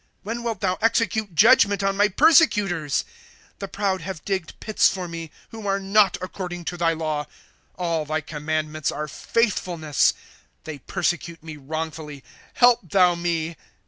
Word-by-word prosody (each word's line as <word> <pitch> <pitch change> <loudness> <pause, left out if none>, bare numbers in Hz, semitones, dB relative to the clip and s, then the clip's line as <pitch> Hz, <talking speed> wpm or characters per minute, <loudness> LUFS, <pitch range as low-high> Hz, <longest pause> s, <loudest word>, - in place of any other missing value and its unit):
When 230 +3 -4
wilt 230 -4 -3
thou 185 -2 0
execute 220 -4 +1
judgment 205 -1 +5
on 195 0 +1
my 205 +1 +4
persecutors? 205 - +3 0.5
^ - - -43
The 195 - -5
proud 195 -2 -1
have 180 -2 -7
digged 190 -5 -3
pits 215 - +3
for 185 -2 -4
mo, 165 -1 -6 0.2
Who 220 -2 -7
are 195 0 +1
not 195 0 +3
according 180 -2 -6
to 175 - -3
thy 170 -1 +2
law. 155 -2 -2
^ - - -33 0.5
All 170 -3 -1
thy 155 +1 -2
commandments 155 0 -3
are 150 - -4
faithfulness; 175 - 0 0.5
They 155 -3 -7
persecute 170 0 -3
me 160 -1 -8
wrongfully; 150 0 -6 0.3
help 245 -1 +5
thou 180 -1 +4
me. 170 -2 -2
175 Hz, 155 wpm, -23 LUFS, 155-200 Hz, 0.5 s, judgment